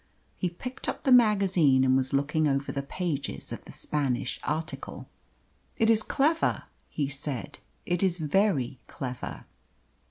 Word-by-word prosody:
He 180 - -1
picked 250 +9 -6
up - - -4
the 265 - +2
magazine 195 - +5
and 130 0 +4
was 130 0 +1
looking 150 +3 +2
over 140 0 0
the 140 - -2
pages 140 - -3
of - - -6
the - - -10
Spanish 135 -4 -2
article. 155 +2 -4 0.7
"It 225 -2 +4
is 220 -1 +4
clever," 310 +8 +1 0.3
he 145 -3 -1
said. 135 -4 -5 0.3
"It 175 0 0
is 185 -3 +2
very 150 - +1
clever." 125 -2 -6
150 Hz, 145 wpm, -28 LUFS, 135-195 Hz, 0.7 s, magazine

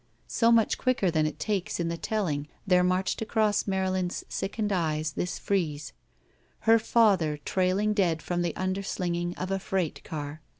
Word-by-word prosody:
So 230 0 +3
much 230 -2 +3
quicker 250 -8 +1
than 155 -1 +2
it 155 - -5
takes 195 +1 -2
in 170 - 0
the 170 - -2
telling 165 -5 -2 0.2
there 180 -2 +4
marched 185 +3 0
across 215 -2 +1
Marylin's 185 -2 -1
sickened 210 +1 -2
eyes 155 -4 0
this 180 +4 -3
frieze: 155 -7 -2 0.7
Her 225 +1 +5
father 200 -9 +3
trailing 190 +3 +1
dead 175 -6 +1
from 175 +2 -1
the 175 -2 -1
imderslinging 180 -2 -2
of 185 +1 -4
a 195 - 0
freight 185 -4 -2
car. 150 0 -6
185 Hz, 160 wpm, -28 LUFS, 165-205 Hz, 0.7 s, Her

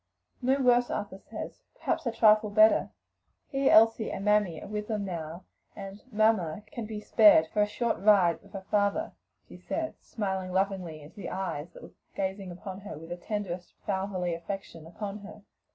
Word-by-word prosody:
"No 265 +2 +2
worse, 245 -2 +4
Arthur 200 -2 -4
says; - - -8
perhaps 320 - -2
a - - +1
trifle 215 -1 +5
better. 215 +1 +5 0.6
He, 270 -1 +2
Elsie 225 0 +5
and 195 - -5
Mammy 210 -6 +2
are - - -9
with 210 0 -4
them 210 -3 -2
now, 170 -1 -5 0.3
and 195 0 -8
'Mamma' 210 -5 +2
can 230 -3 -5
be 215 -1 -5
spared 210 -6 +6
for 210 - +2
a 205 - +3
short 235 +2 -1
ride 190 -4 +4
with 200 - -20
her 190 -1 -7
father," 205 -1 +1 0.4
she - - -12
said, 320 -1 -3
smiling 190 -4 -3
lovingly 185 -5 -1
into 150 +8 -15
the 195 - -5
eyes 180 -4 -4
that - - -12
were - - -11 0.2
gazing 190 0 -3
with 175 0 -9
the 185 -4 -7
tenderest 180 -2 -5
fatherly 190 -3 -1
affection 170 -1 -6
upon 200 +4 -6
her. 210 +1 -12
200 Hz, 170 wpm, -29 LUFS, 185-215 Hz, 0.6 s, spared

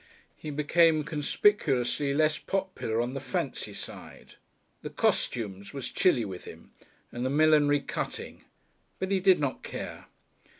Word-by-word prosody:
He 155 - -8
became 155 +2 +3
conspicuously 145 - +1
less 155 +1 +2
popular 190 -12 -2
on 120 +2 -3
the 135 - -3
"fancy" - - -3
side, - - -10 0.5
the - - -6
"costumes" 100 -3 -1
was 135 -3 -5
chilly 155 - +3
with 95 -3 -7
him - - -12 0.4
and 120 - -4
the 130 - 0
"millinery" 145 0 +4
cutting. - - -5 0.5
But 190 +1 -3
he 195 - +3
did 185 -1 +5
not 140 -3 -2
care. - - -7
145 Hz, 135 wpm, -28 LUFS, 125-165 Hz, 0.5 s, did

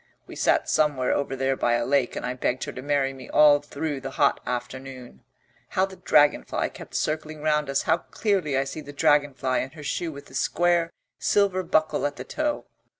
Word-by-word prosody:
"We - - -11
sat - - +2
somewhere 145 -5 +2
over 140 -1 -1
there 135 0 0
by 120 -2 +1
a 120 0 +1
lake 135 -2 +1
and - - -4
I 125 - -2
begged 125 0 -1
her - - -4
to 130 - -8
marry 140 -1 0
me 130 - -11
all 150 -1 +6
through 145 0 -4
the 135 - -5
hot 140 +1 +2
afternoon. 125 - -6 0.5
How 190 - +2
the 190 -1 -12
dragonfly 150 -4 +2
kept - - -11
circling 155 0 -2
round 150 -2 +1
us: 140 - +1
how 160 - +3
clearly 185 -12 -1
I 135 - +2
see 135 +3 -6
the 145 -1 -10
dragonfly 140 -3 +2
and 135 - -6
her 150 - -10
shoe 165 +3 -2
with 140 -1 -10
the 130 - -17
square 170 +4 +1 0.3
silver 200 -2 +2
buckle 155 -4 +1
at 145 - -7
the - - -7
toe. 300 -1 -2
145 Hz, 205 wpm, -25 LUFS, 135-155 Hz, 0.5 s, all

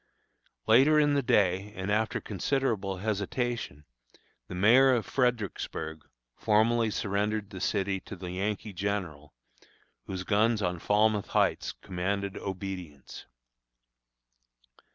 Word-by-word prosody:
Later 135 +7 +6
in 145 -1 +3
the 140 - +2
day, 105 -5 +1
and 95 +1 -3
after 110 +1 0
considerable 105 -2 -1
hesitation, 105 - -3 0.6
the - - -7
mayor 125 +8 +6
of 115 -5 -1
Fredericksburg 105 - -2 0.3
formally 115 +1 +2
surrendered 105 0 -2
the 95 -3 -8
city 95 -1 0
to 100 - -9
the 90 -1 -7
Yankee 100 +2 -3
General, 90 -7 -4 0.7
whose 95 -1 -4
guns 110 +3 +2
on 90 -3 -1
Falmouth 105 +2 +2
Heights - - +1
commanded 100 +1 -2
obedience. 90 -7 -7
100 Hz, 110 wpm, -29 LUFS, 95-110 Hz, 0.7 s, Later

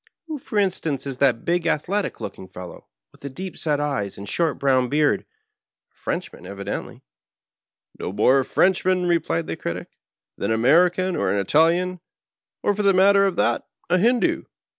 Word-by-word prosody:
Who, 315 -3 -5
for 220 - -5
instance, 170 -8 0
is 135 -2 -5
that 130 -4 +2
big, 170 0 +1
athletic 190 +6 -1
looking 95 - -7
fellow 90 -1 -10 0.2
with - - -22
the 140 - -5
deep 185 +7 -7
set 150 -2 0
eyes 135 -10 -2
and 100 - -8
short 165 +3 0
brown 130 -2 +2
beard? 150 +2 +1 0.7
A - - -44
Frenchman, - - -5
evidently," 100 0 -6 0.5
" - - -36
No - - -4
more 130 +7 +4
a 130 - 0
Frenchman," 185 -1 +2
re 170 -1 +3
plied 85 - -2
the - - -4
Critic, - - -5 0.2
" - - -68
than 100 - -1
an 110 - +2
American, 175 +9 +3
or - - 0
an 100 - +1
Italian, 170 - +2 0.6
or, 205 - +2
for 205 - -2
the 200 -1 +4
matter 195 +1 +5
of 190 - -2
that, - - 0 0.2
a 180 - +4
Hindoo. 240 +5 +2
165 Hz, 185 wpm, -23 LUFS, 130-185 Hz, 0.7 s, matter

